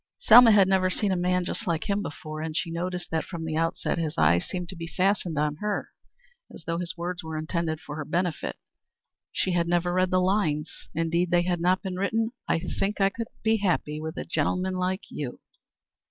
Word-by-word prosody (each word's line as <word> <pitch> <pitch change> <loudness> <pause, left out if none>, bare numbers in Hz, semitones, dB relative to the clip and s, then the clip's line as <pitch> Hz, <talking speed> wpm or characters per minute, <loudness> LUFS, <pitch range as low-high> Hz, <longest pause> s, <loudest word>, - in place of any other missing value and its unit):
Selma 235 +1 +8
had 200 -3 +6
never 190 -1 +3
seen 200 +2 0
a - - +2
man 180 0 +1
just 215 - -4
like 165 -2 -1
him 200 0 +1
before, 155 -2 -6
and 160 0 -3
she 170 - -1
noticed 180 +1 -3
that 160 -1 0
from 170 -3 -6
the 160 -1 -2
outset 165 +1 0
his 155 -2 -2
eyes 85 +3 +4
seemed 180 -1 -4
to 185 - -8
be 165 -1 -6
fastened 185 -3 0
on 150 0 0
her 210 +3 -2 0.6
as - - -11
though 165 0 -1
his 175 0 -3
words 175 +1 -4
were 160 -1 -5
intended 160 0 -2
for 155 -2 -8
her - - -3
special - - -15
benefit. 175 -2 -1 0.8
She 190 - 0
had 170 -1 +1
never 175 0 +1
read 185 0 +2
the 185 -1 +3
lines 180 -5 0
indeed 165 +2 +1
they 175 0 +3
had 175 -1 -1
not 185 +3 +2
been 185 -2 -4
written 225 +4 0 0.2
"I - - +2
think 195 +5 -2
I 195 0 +4
could 230 +3 -5 0.2
be 220 0 +3
happy 175 -6 0
with 160 +2 -5
a - - -4
gentleman 185 +2 0
like 185 +2 -1
you." 135 -5 -5
175 Hz, 215 wpm, -27 LUFS, 160-190 Hz, 0.8 s, Selma